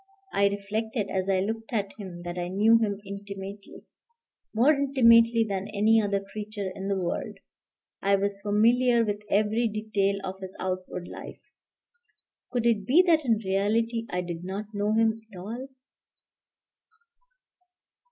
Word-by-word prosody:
I 200 0 +4
reflected 205 +2 -3
as 190 0 -1
I 190 -1 +2
looked 225 +3 -4
at 200 -4 -1
him 180 -4 -8
that 175 0 -5
I 175 -1 -3
knew 215 +5 +4
him 205 -3 -1
intimately, 200 0 -8 0.7
more 245 +8 +4
intimately 230 -5 +5
than 195 -1 -3
any 215 +2 +3
other 200 -1 0
creature 210 -2 -5
in 195 +1 -6
the 200 - +1
world, 175 -2 -3 0.6
I 200 0 +3
was 200 0 -2
familiar 235 +3 +3
with 205 -1 -2
every 215 +3 +2
detail 215 -2 0
of 190 0 -5
his 190 -1 -8
outward 185 -1 -4
life; - - -10 1.1
could 240 -2 -1
it 215 -4 +2
be 325 +8 +6
that 325 -3 +4
in 230 -4 +2
reality 225 +4 0
I 180 - -1
did 170 -1 -6
not 200 +3 -6
know 205 +1 0
him 225 0 +2
at 190 - -11
all? 230 +8 -6
205 Hz, 145 wpm, -27 LUFS, 195-225 Hz, 1.1 s, be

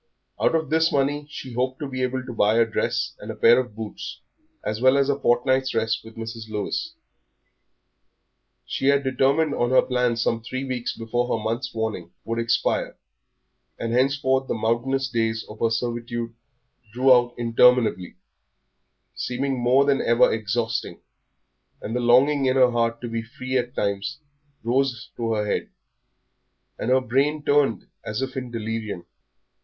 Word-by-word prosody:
Out - - +3
of 160 -3 -1
this 160 +1 +3
money 145 +1 0
she 130 -3 -8
hoped 130 +2 -1
to 145 - -5
be 130 -1 -4
able 130 0 -1
to 125 - -6
buy 105 -1 +3
a 115 - +5
dress 110 - -1
and - - -9
a - - -4
pair 120 +2 +6
of 125 -5 -4
boots, 110 +2 -7 0.4
as 110 +1 -3
well 130 +2 +5
as 140 0 +2
a 140 0 0
fortnight's 130 +2 +2
rest 110 -1 0
with 110 0 -13
Mrs. 115 0 -7
Lewis. 110 - -3 1.7
She 135 - -2
had 140 0 +4
determined 135 +4 +2
on 120 - 0
her 130 - +5
plans 125 -2 0
some 115 0 0
three 130 +4 -5
weeks 130 -3 -3
before 120 +2 -1
her 115 -3 -1
month's 120 +4 -2
warning 110 -6 -3
would 115 +1 -3
expire, 115 0 0 0.8
and 115 0 -3
henceforth 130 +1 +2
the - - -1
mountainous 120 +5 0
days 115 -3 -1
of 105 - -11
her 115 - +2
servitude 120 0 -3 0.6
drew 130 +3 +5
out 120 -1 +2
interminably, 115 -5 +3 1.0
seeming 130 +1 -2
more 125 +3 +4
than 140 -1 +2
ever 115 +1 +4
exhausting, 110 +1 -2 0.8
and 115 - -5
the - - +1
longing 130 +4 +4
in 130 - +2
her 130 -2 +5
heart 115 -1 0
to 120 - -4
be 115 0 -3
free 130 +3 -6
at 125 0 -1
times 100 +7 -2 0.5
rose 130 +1 0
to 115 -1 -1
her 105 -1 0
head, 105 - -2 1.1
and - - -2
her 130 +1 +4
brain 140 +5 0
turned 145 -5 +2 0.2
as 110 +5 -3
if 130 0 -5
in 130 -2 -4
delirium. 110 -5 -4
120 Hz, 165 wpm, -24 LUFS, 115-130 Hz, 1.7 s, pair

